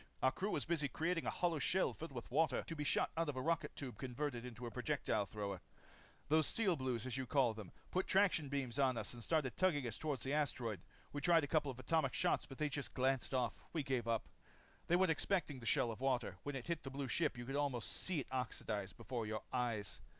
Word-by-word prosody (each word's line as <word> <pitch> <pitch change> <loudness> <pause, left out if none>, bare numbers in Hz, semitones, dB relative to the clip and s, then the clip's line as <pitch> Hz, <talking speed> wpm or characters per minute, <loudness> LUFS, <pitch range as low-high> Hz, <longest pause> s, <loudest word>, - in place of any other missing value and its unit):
Our 130 - +6
crew 195 +8 -2
was 150 - 0
busy 160 -3 +1
creating 165 +5 -1
a - - +3
hollow 170 -3 +1
shell 185 +6 +2
filled 165 -1 -7
with 120 -2 -7
water 145 -1 +3
to 165 - -5
be 150 - -2
shot - - +2
out 165 -1 +1
of 145 - -2
a 130 - -2
rocket 165 +1 0
tube 130 -4 -6
converted 130 -1 -2
into 125 -1 -7
a 120 - -4
projectile 125 -6 0
thrower. 100 -2 -4 0.7
"These 155 +1 +5
Steel 200 -6 +2
Blues, 130 -5 -1
as 130 0 -2
you 130 -1 -2
call 130 -4 +3
them, 105 -4 -8 0.2
put 185 - +1
traction 185 -7 +4
beams 135 -2 -2
on 130 -3 +3
us - - -2
and 120 -1 -7
started 150 -4 +1
tugging 160 -8 +3
us 115 -2 -3
toward 150 -4 -1
the 135 - -1
asteroid. 125 - 0 0.3
We 145 - -2
tried 170 -1 +5
a - - -1
couple 150 -1 +2
of 130 - -5
atomic 135 0 +1
shots 175 +1 +2
but 135 - -10
when 155 - +2
they - - +1
just 140 -1 -3
glanced 130 0 +1
off, 125 -2 0
we 160 -3 0
gave 130 -4 -1
up. 115 -1 0 0.6
"They 175 - +4
weren't 185 -1 +4
expecting 160 -4 0
the 115 - -6
shell 115 - +3
of 115 - -8
water. 125 -8 0
When 145 -1 -4
it 125 - -4
hit 170 -2 -1
that 135 - -6
blue 135 0 -3
ship, 150 +2 +1
you 120 - -5
could 135 +2 -3
almost 140 -5 0
see 180 -6 0
it - - -9
oxidize 110 -5 -2
before 115 0 -4
your 110 0 -3
eyes. 115 -5 -1
135 Hz, 240 wpm, -39 LUFS, 120-155 Hz, 0.7 s, Our